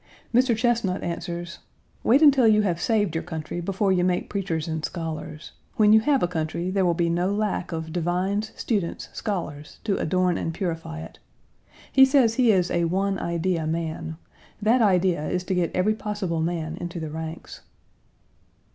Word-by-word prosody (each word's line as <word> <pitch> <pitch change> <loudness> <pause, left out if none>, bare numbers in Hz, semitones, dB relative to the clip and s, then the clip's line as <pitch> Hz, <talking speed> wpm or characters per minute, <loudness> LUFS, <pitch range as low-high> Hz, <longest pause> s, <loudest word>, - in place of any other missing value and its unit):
Mr. 245 -1 +3
Chesnut 225 -5 0
answers: 175 0 -5 0.4
"Wait 270 +7 +5
until 270 -5 +6
you 215 -1 +5
have 175 -4 -1
saved 205 -6 +1
your 165 - -2
country 160 +2 -5
before 195 +2 0
you 180 -1 +2
make 180 0 0
preachers 175 -6 -2
and 160 -1 -3
scholars. 160 -2 -5 0.2
When 210 -1 +5
you 220 - +8
have 275 +4 +2
a - - +3
country, 170 +1 -3
there 195 0 +1
will 175 -2 +2
be 170 0 +1
no 175 +3 +1
lack 205 -3 -1
of 160 -1 -5
divines, 185 +5 -1
students, 200 -8 -2
scholars 155 -8 -4
to 205 -3 0
adorn 180 +1 +1
and 165 - -3
purify 165 -3 -4
it." - - -11 0.7
He 265 - +7
says 265 -4 +5
he 240 -1 +4
is 180 -3 +2
a 170 0 +1
one 195 +3 0
idea 170 -1 -1
man. 160 0 -3 0.4
That 225 +4 +3
idea 180 -6 +2
is 180 0 -1
to 190 - -2
get 180 -2 +1
every 190 +4 +2
possible 205 -6 -3
man 165 -1 -2
into 175 0 -5
the 160 -2 -5
ranks. 160 +1 -7
180 Hz, 175 wpm, -25 LUFS, 165-210 Hz, 0.7 s, you